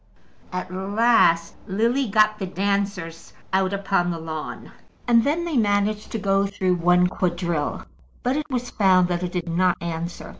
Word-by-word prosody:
At 185 0 -5
last 195 -3 +3
Lily 235 +7 +1
got 215 +1 +3
the 190 - -3
dancers 195 -3 -3 0.2
out 190 0 +2
upon 195 -3 0
the 170 - -2
lawn, 160 -1 -7 0.4
and 230 -1 +5
then 315 +6 0
they 325 -5 -1
managed 210 -1 0
to - - -1
go 195 -1 +1
through 185 -2 0
one 180 +1 +4
quadrille. 175 -4 -2 0.4
But 255 +2 +1
it 300 0 -3
was 245 -2 -3
found 185 -3 +3
that 175 0 -1
it 180 -1 -3
did 175 -2 -3
not 175 +1 +1
answer. 170 0 -5
195 Hz, 160 wpm, -23 LUFS, 175-215 Hz, 0.4 s, and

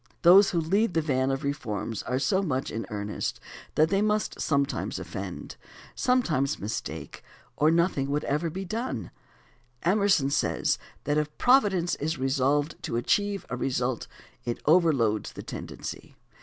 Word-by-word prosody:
Those 190 +4 +8
who 175 - 0
lead 190 +5 +1
the 160 - +3
van 130 -3 +1
of 135 +2 -1
reforms 115 -7 -3
are 125 - -2
so 190 +8 +2
much 135 -8 -2
in 115 +1 -4
earnest 105 0 -3 0.4
that 155 +1 +4
they 195 +1 +2
must 210 0 0
sometimes 140 -2 0
offend, - - -6 0.4
sometimes 165 - +1
mistake, 105 +3 -5 0.3
or 150 +3 +4
nothing 165 -5 +2
would 145 +1 0
ever 150 +4 0
be 190 +4 -5
done. 220 - -4 0.7
Emerson 190 -6 +3
says - - +1 0.2
that 145 +1 +1
if 150 0 -4
Providence 205 -9 +3
is 160 +3 -2
resolved 140 +3 0
to 115 - -2
achieve 200 +10 0
a - - 0
result 125 -1 -1 0.4
it 120 - -3
over 165 +1 +5
loads 110 -7 0
the - - -8
tendency. - - -7
150 Hz, 150 wpm, -27 LUFS, 130-190 Hz, 0.7 s, Those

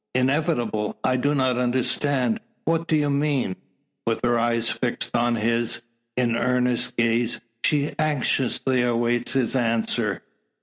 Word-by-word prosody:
"Inevitable! 130 -6 0
I 130 - +2
do 145 +3 +1
not 130 -2 +1
understand. 130 - +1 0.3
What 165 0 0
do 160 - +2
you 145 -1 +2
mean?" 140 -8 0 0.5
With 115 - 0
her 120 -1 +2
eyes 115 0 +1
fixed 120 +1 -2
oh 120 0 +2
his, 115 +1 0 0.3
in 120 -2 +2
earnest 125 0 0
gaze, 115 0 +1 0.2
she 145 -1 +2
anxiously 130 -3 +1
awaits 120 0 +1
his 130 -2 +1
answer. 115 -4 0
125 Hz, 130 wpm, -24 LUFS, 115-140 Hz, 0.5 s, I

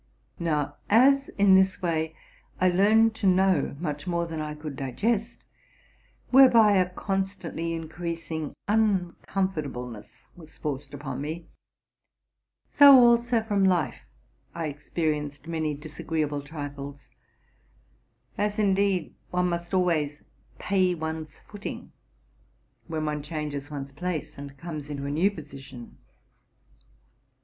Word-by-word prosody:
Now, 150 -4 -1
as 275 +5 +5
in 200 -1 +6
this 190 0 +4
way 160 -2 -1 0.4
I 185 0 +4
Tearned 220 +5 +4
to 200 - 0
know 185 -6 +3
much 150 -3 -4
more 170 -1 0
than 160 -2 -5
I 150 0 -4
could 150 -2 -7
digest, 210 - -2 0.9
whereby 235 -6 +7
a 180 -1 +2
constantly 190 -3 -3
increasing 165 -1 -5
uncomfortable 190 - 0
ness 115 0 -12
was 160 -3 -15
forced 145 -1 -5
upon 140 -2 -5
me; 160 +3 -5 1.2
so 280 -2 +8
also 235 -1 +4
from 205 -3 +1
life 180 -5 +2 0.6
I 165 -2 -2
experienced 150 0 -3
ADD 155 -3 -2
disagreeable 150 -1 -3
trifles, 140 -3 -8 1.3
—as, 210 0 0
indeed, 195 -4 +1 0.2
one 180 0 +1
must 170 0 -4
always 160 -6 0 0.3
pay 185 -2 +1
one's 160 -1 -5
footing 205 -1 -7 1.0
when 155 -2 -3
one 150 -1 -2
changes 150 -2 -5
one's 140 -2 -6
place 175 +2 -4
and 140 0 -9
comes 155 -3 -7
into 140 -1 -4
a 140 - -2
new 165 +7 +3
position. 135 - -11
165 Hz, 115 wpm, -26 LUFS, 145-190 Hz, 1.3 s, so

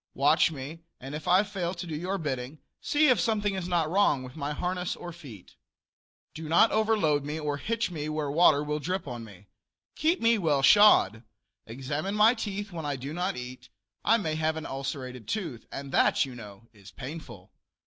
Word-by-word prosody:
Watch 145 +5 +4
me, 150 +1 -7 0.2
and 135 +3 -8
if 150 0 -6
I 185 +3 +5
fail 190 -3 -4
to 175 +1 -6
do 160 -3 -5
your 185 +5 -2
bidding, 135 -3 -4 0.2
see 300 0 +3
if 250 - +4
something 210 -3 0
is 185 -2 -4
not 170 -3 +1
wrong 160 -6 +2
with 125 0 -10
my 145 -2 -3
harness 180 +3 -2
or 175 -1 -8
feet. 135 - -13 0.8
Do 155 0 -7
not 175 +7 +5
overload 215 -10 +2
me 150 +2 -4
or 145 -2 -2
hitch 230 +4 -2
me 155 -2 -4
where 155 -2 -2
water 150 -2 +5
will 150 0 -2
drip 180 +3 -3
on 120 -3 -6
me. 105 -3 -14 0.5
Keep 330 +4 +1
me 230 -1 +3
well 150 -6 +1
shod. 135 - +6 0.5
Examine 145 - -4
my 215 +3 +6
teeth 205 -3 -5
when 165 -2 -6
I 145 -1 -2
do 135 +3 -6
not 180 +1 -2
eat; 125 +1 -8 0.3
I 230 - +4
may 165 -8 -2
have 160 0 -1
an 160 - -5
ulcerated 130 -4 -5
tooth, 165 - -4
and 140 -1 -7
that, - - +3
you 130 - -9
know, 105 -2 -12
is 100 -2 -15
painful. 125 - -9
155 Hz, 195 wpm, -28 LUFS, 135-185 Hz, 0.8 s, shod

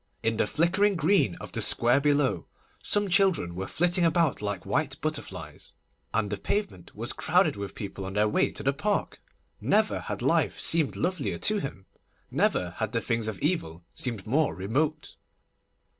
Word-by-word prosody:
In 115 0 0
the - - +1
flickering 190 - +2
green 165 - +2
of - - -10
the - - -3
square 120 +4 +5
below 140 - +1 0.3
some 205 0 +2
children 185 - +2
were 95 +2 -5
flitting 175 +1 +1
about 165 -7 +2
like 100 -3 -4
white - - -1
butterflies, - - -5 0.4
and 105 -2 -1
the 105 - -2
pavement 195 - -3
was - - -4
crowded - - +2
with 100 -1 -6
people 100 -1 -6
on 95 - -6
their 105 +1 +2
way 105 - +2
to - - -5
the 135 - +2
Park. 205 +9 -2 0.4
Never - - +2
had - - -5
life - - +1
seemed 160 -4 +3
lovelier 185 +1 -2
to 215 -1 +2
him, 135 - -6 0.5
never 90 -1 +1
had 110 -1 -3
the 115 - +1
things 115 -1 -1
of 110 -3 -3
evil 90 - -1
seemed 115 -7 -3
more 145 +6 +1
remote. 145 +11 -2
135 Hz, 170 wpm, -27 LUFS, 100-170 Hz, 0.5 s, square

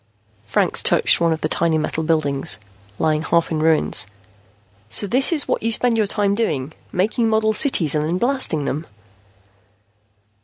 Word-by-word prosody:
Franks - - 0
touched - - +3
one 170 -1 +2
of 160 - -2
the - - 0
tiny 165 0 0
model 155 +1 -2
buildings, 145 - -1 0.4
lying 155 -1 0
half 170 +1 0
in 155 - -1
ruins. 155 -8 +1 0.8
"So 115 - +1
this 255 - +2
is 310 -4 +1
what - - -1
you 230 - -1
spend 240 +1 +2
your 215 -2 +1
time 200 -1 0
doing 155 - -2 0.2
making 220 +5 0
model 220 0 +1
cities 210 - +2
and 150 -1 0
then 170 +3 -1
blasting 240 - +1
them." 155 +4 -4
170 Hz, 160 wpm, -20 LUFS, 155-220 Hz, 0.8 s, touched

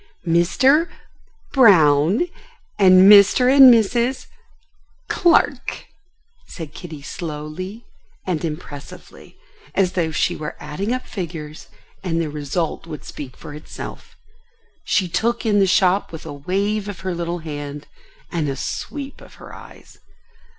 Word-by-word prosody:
"Mr.—Brown, 190 - +2 0.5
and 185 0 +7
Mr. 210 +6 +6
and 270 -2 +10
Mrs.—Clark," 255 - -1 0.6
said 160 -4 -9
Kitty 155 -6 -10
slowly 170 +8 -7 0.4
and 175 -4 -2
impressively, 150 -3 -9 0.4
as 190 -2 +2
though 170 -3 -1
she 175 +2 0
were 150 -1 -6
adding 180 +9 -4
up 255 0 -2
figures 160 -6 -7 0.4
and 165 -3 -1
the 160 -3 -2
result 150 +3 -3
would 155 -3 -8
speak 135 -3 -9
for - - -10
itself. 150 +1 -10 0.7
She 190 -3 +1
took 230 +8 -1
in 210 -2 +3
the 195 - +3
shop 185 +1 +2
with 160 - -9
a - - -7
wave 200 +8 -2
of 200 - -8
her 185 -1 -3
little 170 0 -3
hand 145 -3 -7 0.5
and 160 -4 -1
a 135 - -3
sweep 280 - -6
of - - -15
her - - -13
eyes. - - -15
180 Hz, 120 wpm, -20 LUFS, 155-215 Hz, 0.7 s, and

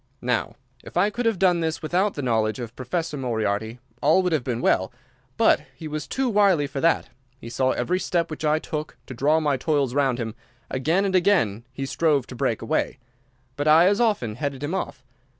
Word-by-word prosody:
"Now, 125 -1 -1 0.3
if - - -8
I 200 +4 +3
could 235 +2 -1
have 225 -4 +1
done 180 -2 +3
this 160 0 -2
without 185 +6 +1
the 145 - -4
knowledge 110 -2 +1
of 120 -2 -7
Professor 160 +3 -3
Moriarty, 110 -3 -2 0.2
all 160 +6 +4
would 180 - 0
have 155 -5 +1
been 120 -2 -2
well. 95 -5 +1 0.5
But 225 - +4
he 160 - -7
was 155 0 -5
too 265 0 -1
wily 200 -9 +3
for 140 -1 -5
that. 165 0 +2 0.3
He 115 -2 -10
saw 130 +2 +1
every 180 +1 0
step 170 -2 -1
which 155 - -6
I 155 0 +3
took 155 -1 -5
to - - -8
draw 145 +6 +2
my 145 -3 +1
toils 140 -3 0
round 135 -3 +1
him. 115 -3 -4 0.4
Again 160 +9 +1
and 195 - -1
again 170 - +2
he 135 +1 -4
strove 145 -2 +1
to 125 - -10
break - - -1
away, - - -1 0.6
but 145 +2 -2
I 160 +3 +7
as 200 +4 +3
often 165 - 0
headed 140 -1 -3
him 145 +5 -2
off. 140 -8 -4
150 Hz, 205 wpm, -24 LUFS, 125-175 Hz, 0.6 s, I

